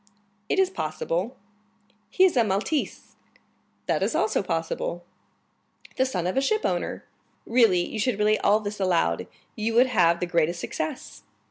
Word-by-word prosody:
"It - - +1
is 380 -1 +3
possible." 170 - -3 0.7
"He 370 - +3
is 375 -5 +4
a 240 - +4
Maltese." 215 +9 -2 0.7
"That - - 0
is - - 0
also - - +1
possible. - - -3 0.9
"The 260 - +2
son 180 -9 -3
of 180 - -1
a 270 - +2
shipowner." 435 +10 -1 0.4
"Really, 220 -7 +3
you 220 - -5
should 225 -1 0
relate 210 0 +2
all 210 +1 +4
this 210 0 -5
aloud, 185 -3 +1 0.3
you 225 0 -2
would 245 +2 +6
have 175 -9 +3
the - - -1
greatest 170 0 0
success." 155 -2 -5
215 Hz, 150 wpm, -25 LUFS, 180-260 Hz, 0.9 s, would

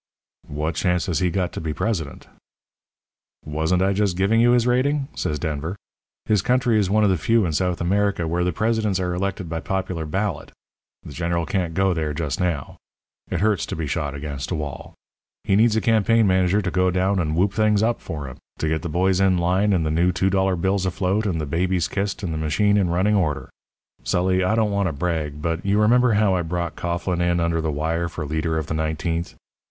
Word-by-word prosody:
"'What 75 +3 -3
chance 90 +1 0
has 90 -5 -1
he 90 -1 +1
got 90 0 -1
to - - -5
be 80 -2 -3
president?' 85 -11 -3 1.2
"'Wasn't 80 +4 0
I 100 +1 +2
just 100 -3 0
giving 105 +4 +3
you 120 +1 +5
his 120 -1 +3
rating?' 135 +3 +1
says 75 - -2
Denver. 80 +4 -3 0.5
'His 105 -3 +2
country 125 -1 +2
is 100 -3 +1
one 105 +2 +3
of 100 - +4
the 90 - 0
few 115 +4 +2
in 80 - -2
South 90 +2 0
America 100 -1 0
where 85 +2 0
the 90 - +1
presidents 110 0 0
are 90 -1 -1
elected 95 0 -3
by 80 0 -3
popular 90 -3 -3
ballot. 95 0 -3 0.5
The - - -10
General 85 0 -1
can't 85 -1 -2
go 95 0 +2
there 80 -3 -2
just 75 -4 -3
now. 85 -7 -2 0.5
It 90 -2 -2
hurts 105 -3 +1
to - - -4
be 80 - -3
shot 70 -1 -2
against 70 -1 -5
a 90 - -1
wall. 75 -3 -6 0.5
He 95 - +2
needs 110 +1 +4
a 110 - +2
campaign 115 0 +3
manager 95 +1 +2
to 95 - -2
go 90 0 +2
down 95 +2 +1
and 80 -2 -1
whoop 95 +3 +2
things 105 -1 +2
up 115 +1 0
for 75 -4 -6
him 65 - -9 0.2
to 80 - -2
get 80 0 0
the 85 - -4
boys 90 +3 +1
in 95 -2 +3
line 90 +4 +2
and 90 -5 +1
the 80 - 0
new 85 +3 +2
two 95 +2 0
dollar 95 0 +2
bills 95 +2 0
afloat 95 +4 0
and 85 -4 -1
the 75 - -2
babies 85 +3 0
kissed 100 +3 -3
and 85 -4 -2
the 80 - -3
machine 100 +7 +2
in 95 -4 +2
running 95 +5 +2
order. 85 -8 0 0.5
Sully, 95 +1 +1
I 105 +4 +2
don't 110 -2 +1
want 100 -1 +1
to 80 - -2
brag, 75 -1 -3
but 85 +1 -1
you 100 +1 +2
remember 120 +2 +4
how 105 -2 +3
I 90 - +1
brought 85 -1 -3
Coughlin 85 +1 -2 0.2
under 85 -1 0
the 80 -1 -1
wire 80 +3 -1
for 80 - -5
leader 80 +2 -1
of 80 - -2
the 75 - -4
nineteenth? 80 +2 -2
90 Hz, 220 wpm, -22 LUFS, 80-100 Hz, 1.2 s, you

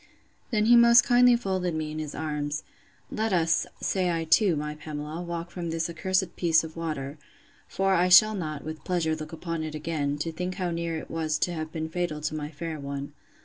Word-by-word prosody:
Then 215 -3 +1
he 240 +2 +7
most 235 0 +8
kindly 245 0 +5
folded 185 -7 -1
me 155 -1 -3
in 155 - -5
his 150 -2 -5
arms: 150 0 -3 0.5
Let 220 0 -1
us, 165 -2 +2
say 185 -2 0
I 165 -1 0
too, 175 +2 +4
my 150 0 -3
Pamela, 150 +1 -6
walk 170 0 -5
from 175 -2 -5
this 165 0 -1
accursed 185 +2 -1
piece 165 -2 +3
of 160 0 -8
water; 155 -3 -4 0.5
for 195 0 +1
I 180 0 +3
shall 215 +4 +8
not, 155 -7 -4
with 155 0 -7
pleasure, 165 -3 0
look 155 0 -8
upon 165 0 -4
it 155 -1 -5
again, 150 -2 -2
to 165 +3 -3
think 180 +3 -4
how 180 -2 -2
near 170 -1 -2
it - - -8
was 160 -1 -1
to 175 - 0
have 155 -1 -5
been 160 -1 -3
fatal 165 -2 -2
to 155 - -2
my 150 -1 -4
fair 160 0 -6
one. 140 0 -5
165 Hz, 210 wpm, -27 LUFS, 155-180 Hz, 0.5 s, most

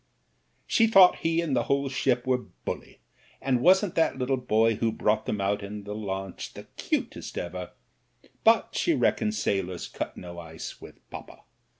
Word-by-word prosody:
"She 225 - +3
thought 195 -4 +7
he 165 +1 +1
and 155 -6 -1
the 120 - +1
whole 140 0 +1
ship 130 -2 0
were 130 -1 +2 0.3
bully, - - -6 0.4
and 130 -2 0
wasn't 190 +4 +4
that 165 -4 +2
little 130 +1 0
boy 115 -3 +2
who'd 115 -1 -1
brought 110 +1 +1
them 105 - -1
out 100 +1 0
in 100 +1 -7
the 105 +1 -6
launch 95 -3 -5
the - - -8
cutest - - -3
ever, 90 0 -4 0.7
but - - +5
she - - +1
reckoned 105 0 +1
sailors 95 -4 -1
cut - - -5
no 85 -1 -8
ice 80 -1 -8
with - - -14
poppa. - - -10
110 Hz, 170 wpm, -27 LUFS, 100-135 Hz, 0.7 s, thought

